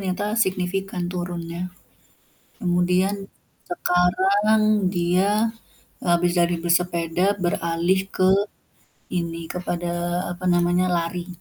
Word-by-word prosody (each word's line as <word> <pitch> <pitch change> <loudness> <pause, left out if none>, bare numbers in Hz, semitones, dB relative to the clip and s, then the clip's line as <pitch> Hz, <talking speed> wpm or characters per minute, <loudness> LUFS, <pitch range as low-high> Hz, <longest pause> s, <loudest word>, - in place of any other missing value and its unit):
nyata 185 +2 -1 0.2
signifikan 190 0 -2
turunnya. 175 0 -4 0.9
Kemudian, 180 +2 +2 0.5
sekarang 190 +5 +2 0.3
dia, 195 +5 +2 0.5
habis 175 0 +2
dari 170 0 +2
bersepeda 175 +2 +1
beralih 170 +2 +1 0.2
ke 185 - +4 0.8
ini, 170 -2 -2
kepada 175 -1 -3 0.4
apa 175 +1 -9
namanya 175 +1 +2
lari. 170 +1 -3
180 Hz, 85 wpm, -23 LUFS, 175-185 Hz, 0.9 s, ke